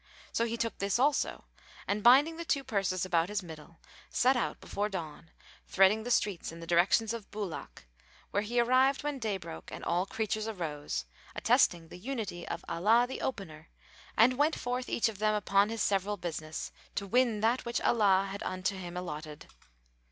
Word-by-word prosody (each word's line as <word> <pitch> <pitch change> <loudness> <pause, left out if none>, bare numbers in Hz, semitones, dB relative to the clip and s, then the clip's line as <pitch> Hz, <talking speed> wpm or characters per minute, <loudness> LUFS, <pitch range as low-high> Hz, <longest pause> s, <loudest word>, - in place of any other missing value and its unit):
So 230 - +2
he 230 0 -3
took 230 -1 -2
this 200 +2 +1
also 280 +3 +1 0.4
and 205 +1 0
binding 280 +8 +6
the 335 - -4
two 280 -4 0
purses 195 -6 -1
about 170 -1 +1
his 205 -2 -2
middle,[FN#441] 160 0 -12 0.3
set 260 +2 +4
out 245 - -1
before 205 +1 -2
dawn 165 -4 -6 0.4
threading 195 +3 +4
the 240 - -5
streets 205 -8 0
in 165 - -10
the 165 - -8
direction 175 +6 +3
of 225 -3 -7
Búlák, 205 -6 -6 0.5
where 205 - +1
he 235 +3 -1
arrived 255 +3 +3
when 295 -2 -2
day 215 -4 -1
broke 80 - -9
and - - -7
all 180 +3 +1
creatures 215 0 -2
arose, 150 - -4 0.3
attesting 165 -2 +3
the 175 - -10
unity 215 -6 -5
of - - -5
Allah 220 +8 +3
the 260 - -6
Opener 170 -10 -5 0.5
and 250 +4 +5
went 305 +2 +3
forth 250 +1 -3
each 230 - +2
of 215 -3 -6
them 215 0 +2
upon 200 0 +3
his 225 -1 -1
several 200 +1 0
business, 160 -3 -5 0.2
to 200 - -2
win 235 0 +2
that 230 +4 +2
which 235 0 -1
Allah 195 -4 +3
had 200 - -6
unto 185 +1 -2
him 180 -2 -7
allotted. 155 -4 -6
205 Hz, 180 wpm, -31 LUFS, 175-235 Hz, 0.5 s, binding